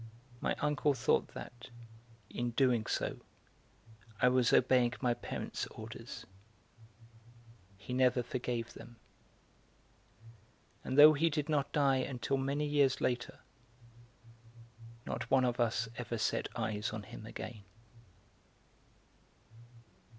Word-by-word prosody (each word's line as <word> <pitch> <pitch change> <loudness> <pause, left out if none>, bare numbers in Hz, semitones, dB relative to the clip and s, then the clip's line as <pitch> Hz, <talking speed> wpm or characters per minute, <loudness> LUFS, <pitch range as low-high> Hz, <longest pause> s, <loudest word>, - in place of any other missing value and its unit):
My - - 0
uncle 150 -1 +1
thought 120 - +1
that, 125 +1 -9 0.6
in 120 +2 -3
doing 125 -5 +3
so - - -2 1.0
I 125 - +5
was 125 -1 +3
obeying 125 -1 +4
my 125 -2 +2
parents' 120 - -5
orders; - - -9 1.5
he 105 +5 -7
never 125 -1 +3
forgave 120 -1 -3
them; 120 - -12 1.9
and 130 - -3
though 150 +1 +10
he 160 +3 +2
did 150 0 -2
not 145 -3 +1
die 140 -3 +3
until 130 +1 -1
many 140 +2 -1
years 145 -3 +2
later, 120 -1 -2 1.6
not - - -4
one 130 -1 +4
of 120 0 -1
us 115 -1 +1
ever 120 -1 -3
set 110 - 0
eyes 110 -2 -2
on 110 -1 -6
him 110 +2 -10
again. 115 -1 -7
125 Hz, 110 wpm, -33 LUFS, 120-135 Hz, 1.9 s, though